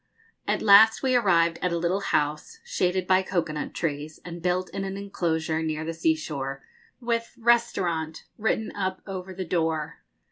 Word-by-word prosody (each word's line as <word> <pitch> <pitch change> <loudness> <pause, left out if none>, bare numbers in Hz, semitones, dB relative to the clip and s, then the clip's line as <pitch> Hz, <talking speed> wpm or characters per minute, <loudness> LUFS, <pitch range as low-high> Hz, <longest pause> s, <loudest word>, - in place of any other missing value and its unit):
At - - 0
last 220 +4 +7
we 260 -1 +2
arrived 170 -7 +3
at 180 - 0
a 170 - 0
little 175 +3 0
house, 150 - -1
shaded 185 - 0
by 185 +1 +4
cocoa 175 -4 -1
nut 150 - -4
trees, 150 -1 -3
and 170 -1 -7
built 180 +1 0
in 195 - -3
an 195 0 -4
enclosure 160 -5 -1
near 155 -1 -2
the 165 - -3
sea 160 0 +2
shore, 135 -3 -5 0.4
with 230 -1 -2
'Restaurant' 190 -9 +1
written 220 0 -1
up 190 -1 -3
over 190 -1 -6
the 185 0 -5
door. 160 -2 -1
180 Hz, 170 wpm, -26 LUFS, 160-200 Hz, 0.4 s, last